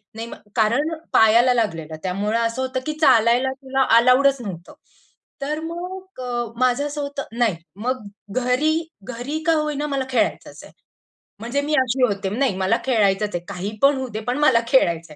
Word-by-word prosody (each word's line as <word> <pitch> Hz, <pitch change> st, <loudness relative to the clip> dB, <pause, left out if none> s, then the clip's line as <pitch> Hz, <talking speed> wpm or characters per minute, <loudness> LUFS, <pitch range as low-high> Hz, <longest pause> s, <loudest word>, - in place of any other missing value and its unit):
नाही 225 Hz, +1 st, -5 dB
मग -, -, -9 dB, 0.2 s
कारण 250 Hz, +9 st, +2 dB, 0.2 s
पायाला 235 Hz, +3 st, +5 dB
लागलेलं 165 Hz, -9 st, -2 dB
त्यामुळं 205 Hz, +5 st, -1 dB
असं 230 Hz, +2 st, -1 dB
होतं 260 Hz, 0 st, -2 dB
की 305 Hz, -, -2 dB
चालायला 250 Hz, -1 st, +4 dB
तुला 265 Hz, 0 st, 0 dB
अलाउडच 255 Hz, +2 st, +4 dB
नव्हतं. 180 Hz, -5 st, -8 dB, 0.7 s
तर 300 Hz, +2 st, -2 dB
मग 365 Hz, -2 st, -8 dB, 0.4 s
माझं 255 Hz, +3 st, +2 dB
असं 290 Hz, 0 st, -5 dB
होतं 280 Hz, 0 st, -4 dB
नाही 225 Hz, -7 st, +2 dB, 0.3 s
मग 255 Hz, -3 st, -1 dB, 0.3 s
घरी, 255 Hz, +7 st, +1 dB, 0.4 s
घरी 275 Hz, +7 st, -4 dB
का 330 Hz, -, +4 dB
होईना 300 Hz, -1 st, -1 dB
मला 275 Hz, -2 st, -2 dB
खेळायचंच 255 Hz, -, -1 dB
आहे. -, -, -14 dB, 0.7 s
म्हणजे 245 Hz, +5 st, -1 dB
मी 305 Hz, -, -2 dB
अशी 255 Hz, +1 st, 0 dB
होते. 200 Hz, -4 st, 0 dB
नाही 240 Hz, -1 st, 0 dB
मला 190 Hz, +5 st, +2 dB
खेळायचंच 210 Hz, -5 st, +1 dB
आहे. 175 Hz, -, -3 dB
काहीपण 210 Hz, +9 st, +1 dB
होऊ 260 Hz, -1 st, -3 dB
दे, 215 Hz, -, -3 dB
पण 250 Hz, +3 st, 0 dB
मला 260 Hz, -6 st, +5 dB
खेळायचंय. 170 Hz, -, +1 dB
250 Hz, 160 wpm, -22 LUFS, 215-280 Hz, 0.7 s, पायाला